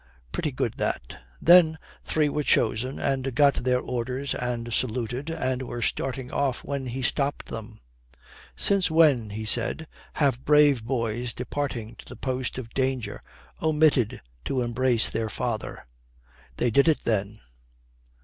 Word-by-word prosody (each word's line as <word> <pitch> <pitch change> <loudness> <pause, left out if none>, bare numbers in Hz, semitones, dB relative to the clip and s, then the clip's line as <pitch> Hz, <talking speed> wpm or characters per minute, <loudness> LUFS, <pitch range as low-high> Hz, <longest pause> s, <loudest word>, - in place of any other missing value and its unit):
Pretty 150 - -2
good 125 -3 -2
that. 60 - -3 0.2
Then 165 -2 +6 0.3
three 155 -1 +1
were 150 +1 -1
chosen 125 -1 +1
and 135 -2 -1
got 140 -1 +5
their 125 0 +2
orders 125 +3 -3
and 120 -1 -3
saluted, 125 +4 -1
and 130 -6 -2
were 120 -2 -4
starting 130 +1 -2
off 135 -3 -1
when 140 -2 -4
he 130 +2 -4
stopped 140 +3 -1
them. 110 0 -8 0.8
"Since 200 -3 +4
when," 150 -9 +4
he 110 +2 -5
said, 160 +8 +2 0.3
"have 135 -4 +1
brave 145 -5 +4
boys 115 -1 -2
departing 125 -4 -4
to - - -13
the - - -10
post 130 -2 -3
of 120 -3 -7
danger 130 -5 -2 0.4
omitted 155 -7 +2 0.2
to 130 - -1
embrace 120 0 +2
their 115 -1 -2
father?" 115 - -4 0.7
They 120 - +1
did 140 +7 +4
it 160 - +3
then. 105 -1 -1
130 Hz, 140 wpm, -26 LUFS, 115-140 Hz, 0.8 s, Then